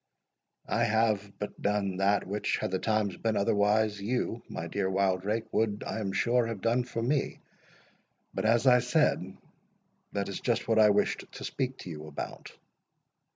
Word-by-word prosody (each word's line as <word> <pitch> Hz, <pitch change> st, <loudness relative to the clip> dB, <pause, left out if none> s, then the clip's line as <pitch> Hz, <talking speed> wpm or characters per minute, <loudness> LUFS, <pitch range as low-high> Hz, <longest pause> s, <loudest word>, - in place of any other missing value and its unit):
"I 115 Hz, +2 st, +1 dB
have 110 Hz, -2 st, +1 dB
but 105 Hz, -, -6 dB
done 100 Hz, -2 st, 0 dB
that 100 Hz, +1 st, +2 dB
which, 100 Hz, +2 st, -1 dB
had -, -, -3 dB
the 95 Hz, -, 0 dB
times 110 Hz, -3 st, 0 dB
been 110 Hz, -1 st, 0 dB
otherwise, 105 Hz, +1 st, +2 dB
you, 115 Hz, +1 st, -1 dB
my 80 Hz, -, -5 dB
dear 95 Hz, +2 st, -1 dB
Wildrake, 100 Hz, +3 st, 0 dB
would, 105 Hz, -2 st, 0 dB
I -, -, -3 dB
am 100 Hz, -3 st, -2 dB
sure, 120 Hz, +3 st, +2 dB
have 115 Hz, -3 st, -4 dB
done 120 Hz, +2 st, +1 dB
for 115 Hz, -2 st, -4 dB
me. 135 Hz, +3 st, 0 dB, 1.0 s
But, -, -, -2 dB
as 115 Hz, +3 st, +3 dB
I 125 Hz, -1 st, +7 dB
said, 125 Hz, -, +1 dB, 0.8 s
that 100 Hz, -1 st, -1 dB
is 100 Hz, -, -4 dB
just 120 Hz, -2 st, 0 dB
what 115 Hz, -1 st, +3 dB
I 105 Hz, -1 st, +7 dB
wished 105 Hz, 0 st, +1 dB
to -, -, -8 dB
speak 130 Hz, 0 st, -2 dB
to 90 Hz, -, -7 dB
you 75 Hz, -1 st, -8 dB
about. 75 Hz, -, -7 dB
105 Hz, 170 wpm, -29 LUFS, 100-115 Hz, 1.0 s, I